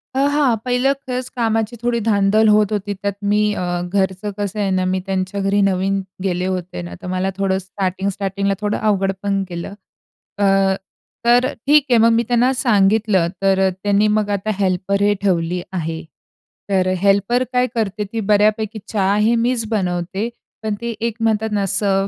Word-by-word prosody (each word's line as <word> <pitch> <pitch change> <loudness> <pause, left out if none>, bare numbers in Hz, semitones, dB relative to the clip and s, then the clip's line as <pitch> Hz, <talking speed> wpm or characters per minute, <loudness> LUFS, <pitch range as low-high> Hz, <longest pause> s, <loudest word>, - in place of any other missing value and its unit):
आह, 275 +1 +3
हां. 285 -5 +3
पहिलं 250 +2 +2
खरंच 255 -2 -5
कामाची 225 -1 0
थोडी 240 -1 +1
धांदल 210 +1 +3
होत 210 -1 +4
होती 205 -1 -2
त्यात 200 +1 -3 0.2
मी 210 +1 +3
अ, 185 - -3 0.3
घरचं 190 +1 0
कसं 205 0 -3
आहे 200 -2 0
ना, 185 0 +1
मी 185 0 0
त्यांच्या 190 0 -2
घरी 200 +1 +2
नवीन 195 0 +1 0.2
गेले 180 -1 -1
होते 180 - -3
ना 85 0 -8
तर - - -7
मला 185 +1 0
थोडं 195 -1 +1
स्टार्टिंग, 190 0 -3
स्टार्टिंगला 195 0 -1
थोडं 210 0 0
अवघड 195 -1 +1
पण 200 -1 0
गेलं. 175 +3 -6 0.6
अ, 205 - +1 0.8
तर 240 +1 +5
अ, 270 - -2
ठीक 295 -1 +5
आहे 240 - +5
मग 230 +1 +5
मी 230 +1 +2
त्यांना 245 +1 +3
सांगितलं 210 -6 +2
तर 195 -1 +3
अ, - - +2
त्यांनी 205 +1 +3
मग 210 -1 -1
आता 200 +2 -2
हेल्परही 200 +2 +1
ठेवली 180 -2 0
आहे. 165 -2 -3 0.7
तर 185 -2 +2
हेल्पर 200 +6 +2
काय 250 0 +2
करते, 210 -2 -1
ती 225 - -1
बऱ्यापैकी 215 +1 +2
चहा 200 -2 +1
हे 215 +3 +3
मीच 235 0 0
बनवते 190 +1 -2 0.3
पण 215 -1 -1
ते 235 - -3 0.2
एक 230 - -4
म्हणतात 220 -1 +1
ना 205 -1 0
सर्व्ह 195 0 +1
200 Hz, 175 wpm, -19 LUFS, 190-225 Hz, 0.8 s, तर